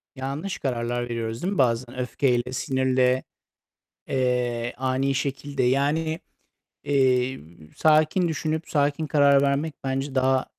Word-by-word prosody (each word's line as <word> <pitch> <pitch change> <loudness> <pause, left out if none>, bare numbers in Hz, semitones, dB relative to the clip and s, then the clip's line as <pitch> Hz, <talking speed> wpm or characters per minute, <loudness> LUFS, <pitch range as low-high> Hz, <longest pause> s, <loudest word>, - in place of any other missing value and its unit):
Yanlış 140 +8 -4
kararlar 120 -2 -2
veriyoruz, 115 -1 -3
değil 185 - 0
mi? - - -4
Bazen 125 -1 +1
öfkeyle, 125 0 0
sinirle, 130 -1 +1 0.8
eee, 125 -2 0
ani 130 +1 0
şekilde. 140 0 -2
Yani, 150 +6 +1 0.6
eee, 130 -2 +2 0.4
sakin 155 +3 +3
düşünüp 160 0 -2
sakin 145 +1 0
karar 140 -2 +5
vermek 140 +2 0
bence 135 +1 -2
daha, 130 0 +2
135 Hz, 115 wpm, -25 LUFS, 125-145 Hz, 0.8 s, karar